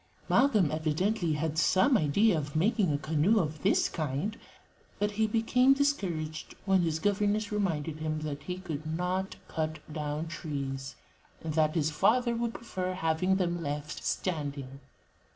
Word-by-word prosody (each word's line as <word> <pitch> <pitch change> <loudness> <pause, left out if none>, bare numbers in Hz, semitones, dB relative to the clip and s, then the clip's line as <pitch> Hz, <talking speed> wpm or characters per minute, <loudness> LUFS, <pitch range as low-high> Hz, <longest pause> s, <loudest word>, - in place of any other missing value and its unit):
'" - - -29
Malcolm 215 - +4
evidently 160 +4 0
had 155 +1 -1
some 190 - +4
idea 200 +3 +3
of 145 -2 -4
making 200 +1 +2
a 145 - +1
canoe 155 +8 +2
of 155 -4 -2
this 195 - +3
kind, 155 +7 -3 0.6
but 210 0 0
he 220 +1 +1
became 250 +4 +4
discouraged 175 - -1
when 190 -2 +4
his 165 -2 0
governess 205 +4 0
reminded 165 -7 -1
him 155 0 -2
that 145 -2 -4
he 180 +3 -5
could 160 -5 -5
not 185 +2 -1
cut 155 -1 -2 0.2
down 150 0 -3
trees, 140 -4 -5 0.5
and 160 -1 -3
that 155 0 +2
his 155 -1 +1
father 235 +9 +2
would 230 0 -2
prefer 185 -5 -3
having 175 +2 +1
them 175 -2 0
left 145 0 -4
standing. 140 -6 -3
165 Hz, 150 wpm, -30 LUFS, 155-205 Hz, 0.6 s, Malcolm